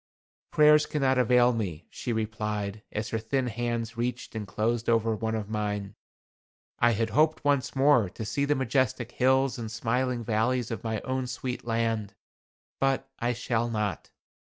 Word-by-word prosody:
"Prayers 150 0 +5
cannot 135 -3 +1
avail 125 0 +4
me," 90 -8 -3
she 125 - -4
replied, 105 -2 -2
as 105 +1 -3
her 115 - -1
thin 130 +4 -1
hands 120 0 -2
reached 120 +1 -3
and 110 -2 -5
closed 115 +4 -1
over 115 -1 +2
one 110 +1 -2
of 110 -2 -3
mine. 105 -2 -3 0.9
"I 120 0 +4
had 115 +1 -1
hoped 155 +1 +2
once 140 -3 +1
more 135 -7 +4
to 110 - -7
see 140 +7 0
the 145 +1 +2
majestic 125 -2 0
hills 130 0 +2
and 110 -2 -5
smiling 120 +2 -1
valleys 115 +2 0
of 115 - -4
my 110 -2 -2
own 130 -1 -2
sweet 125 0 -4
land, 115 -3 -1 0.6
but 135 0 +1
I 120 +1 0
shall 120 -1 -1
not. 105 -3 -2
115 Hz, 160 wpm, -28 LUFS, 110-130 Hz, 0.9 s, Prayers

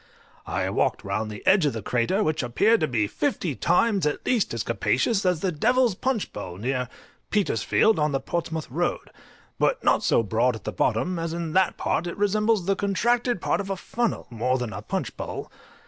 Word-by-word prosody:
I - - -1
walked - - 0
round 105 +3 -2
the 105 -1 -9
edge 190 -5 +5
of 140 - -1
the 110 -3 -5
crater, 125 - +1
which 155 -2 0
appeared 205 - +3
to 155 - +1
be 115 -6 +1
fifty 180 - -1
times 180 - +2
at 150 - -3
least 240 -5 +1
as 115 -2 -2
capacious 185 - +1
as 180 -4 +1
the 190 - 0
Devil's 245 +8 +2
Punch 250 +2 -2
Bowl 90 -4 -7
near 125 +3 -2 0.4
Petersfield, 210 - +2
on 150 0 +2
the 135 - 0
Portsmouth 160 +2 -3
Road, - - -2 0.5
but - - +1
not - - +3
so 115 - +3
broad 115 +3 +1
at 110 - -10
the 110 - -3
bottom, 125 - 0
as 165 0 -3
in 170 -2 -4
that 190 -1 +2
part 175 - -1
it 170 - -5
resembles 210 0 +2
the 195 +1 +2
contracted 235 +2 +1
part - - 0
of 195 - -7
a 195 - -2
funnel 235 +4 -2
more 125 +3 0
than 120 -4 -4
a - - -6
punch - - -3
bowl. - - -6
170 Hz, 200 wpm, -25 LUFS, 125-205 Hz, 0.5 s, edge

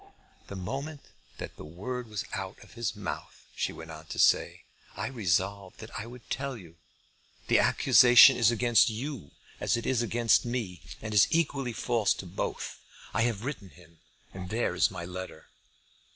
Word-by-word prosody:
"The 100 - -7
moment 140 +10 -5 0.4
that - - -8
the - - -9
word 115 +11 -6
was 105 -3 -4
out 95 +1 -5
of - - -17
his 115 -2 -3
mouth," 105 -2 -7
she - - -1
went 80 0 -10
on 80 0 -10
to - - -7
say, - - +3 0.3
"I - - -3
resolved 100 -4 -1
that 110 - -10
I 110 - -5
would 125 0 -12
tell 135 -1 -3
you. 85 -5 -14 0.7
The - - +5
accusation 125 +2 +7
is 115 -2 +4
against 120 +1 +4
you 115 - -5 0.3
as - - +1
it 115 - -5
is 130 -3 +1
against 120 0 +3
me, 115 - -4 0.2
and 110 -1 -4
is 105 - +6
equally 140 -6 0
false 115 -3 +1
to - - -8
both. 90 +2 -4 0.3
I 110 - +1
have 110 0 -5
written 130 -9 -5
to - - -21
him, 85 -2 -19 0.3
and 95 -1 -7
there 115 +4 0
is - - +3
my 85 - -7
letter." 90 -3 -8
110 Hz, 180 wpm, -29 LUFS, 95-125 Hz, 0.7 s, accusation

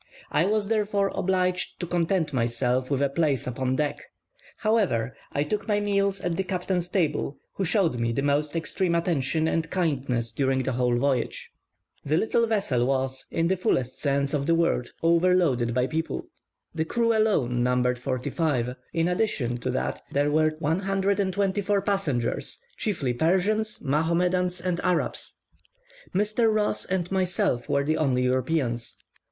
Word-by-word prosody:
I 165 - +3
was, 210 -1 +1
therefore, 205 -2 +1
obliged 185 -1 0
to 175 - -2
content 170 -2 0
myself 125 +1 0
with 140 -1 +1
a 140 - +2
place 140 -3 0
upon 130 +1 -1
deck; 150 +1 -1 0.6
however, 190 - +1 0.2
I 145 - 0
took 205 +10 -3
my 205 -1 +2
meals 200 -1 +1
at 175 -1 -1
the 190 - +1
captain's 180 -1 -2
table, 150 -6 0 0.2
who 195 - -2
showed 175 - +1
me 115 0 0
the 135 +4 -1
most 145 +2 +1
extreme 170 +1 0
attention 160 -2 +1
and 165 0 0
kindness 135 -10 -1
during 135 -1 0
the 130 - -1
whole 125 -1 +1
voyage. 130 -1 -1 0.5
The 150 +2 +1
little 230 +4 +2
vessel 170 - +1
was, 130 -1 -1
in 165 0 0
the 190 - +2
fullest 130 -8 -1
sense 140 0 0
of 140 -2 -1
the 165 - +4
word, 165 -7 +1
overloaded 165 -8 +3
with 125 0 +1
people; 160 - -2 0.5
the 160 -1 0
crew 230 +6 +1
alone 145 - +2
numbered 125 0 +1
forty 130 0 -3
five; 130 -7 0 0.2
in 165 0 +1
addition 180 - 0
to - - -3
that - - -2
there 145 +1 +1
were 155 +1 +2
124 195 +4 0
passengers, 160 - -1 0.2
chiefly 155 - -1
Persians, 190 - +1
Mahomedans, 175 +5 +1
and 180 -1 -1
Arabs. 180 -2 -1 0.8
Mr. 215 +3 +2
Ross 210 -1 0
and 185 -1 -2
myself 180 -9 0
were 140 -1 +2
the 155 +2 0
only 130 -5 +1
Europeans. 125 -2 0
160 Hz, 155 wpm, -26 LUFS, 130-190 Hz, 0.8 s, the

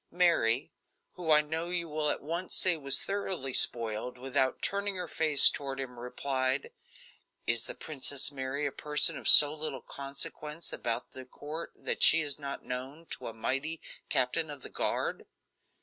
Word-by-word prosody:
Mary, 165 -9 +1 0.4
who 175 -3 -7
I 150 -1 +6
know 160 +3 -5
you 175 -1 -2
will 150 -1 -2
at - - -3
once 170 +5 -5
say 185 -2 +2
was 140 -3 +3
thoroughly 190 -9 -4
spoiled, 115 +1 +2
without 130 +1 -1
turning 200 0 -2
her 180 -1 -5
face 155 -3 +5
toward 135 -1 -1
him, 125 -2 -7
replied: 130 +2 -3 0.7
"Is 115 0 -1
the - - -8
Princess 140 -2 0
Mary 135 +1 -4
a 140 - -2
person 150 +2 +2
of - - -7
so 145 0 +11
little 150 -4 -6
consequence 150 +3 -6
about 120 +1 -4
the 130 - -10
court 150 +5 -7
that - - -4
she 165 - +5
is 145 -2 -3
not 140 -1 -7
known 135 +6 -7
to - - -7
a 115 - -7
mighty 135 +8 -3 0.3
captain 135 +5 0
of 145 -3 -10
the - - -9
guard?" - - -3
145 Hz, 165 wpm, -29 LUFS, 130-160 Hz, 0.7 s, so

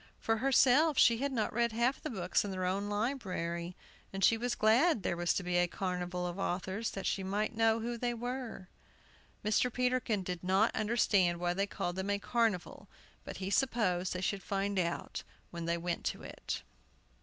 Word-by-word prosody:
For 225 0 +1
herself, 270 +4 +4
she 230 -1 +5
had 280 +1 -1
not 225 -5 -1
read 235 0 +1
half 240 +4 +1
the - - -4
books 185 -6 0
in 205 - -4
their 185 -1 -2
own 195 +3 -1
library. 185 -7 -2 0.4
And 195 0 -4
she 230 - +6
was 240 +2 -1
glad 230 - +4
there - - 0
was 175 0 +1
to 195 - -1
be 180 0 0
a 175 0 +3
Carnival 180 -1 -3
of 175 +2 -4
Authors, 190 +4 -2
that 195 - -5
she 195 - 0
might 205 +4 -1
know 225 0 +3
who 235 +1 -3
they 240 0 -1
were. 245 -4 -5 0.8
Mr. 220 +4 +2
Peterkin 250 -5 0
did 180 -1 -5
not 190 +5 +3
understand 205 -6 +2
why 175 0 0
they 195 +2 0
called 175 -2 -3
them 190 +1 -2
a 200 - +2
"Carnival"; 220 -3 -1 0.4
but - - -7
he 190 0 -4
supposed 200 -8 +1
they 180 - -4
should 195 +1 -1
find 200 0 -1
out 170 -1 -2 0.3
when 170 -1 -5
they 170 0 0
went 170 0 -3
to - - -2
it. - - -5
200 Hz, 190 wpm, -32 LUFS, 180-235 Hz, 0.8 s, she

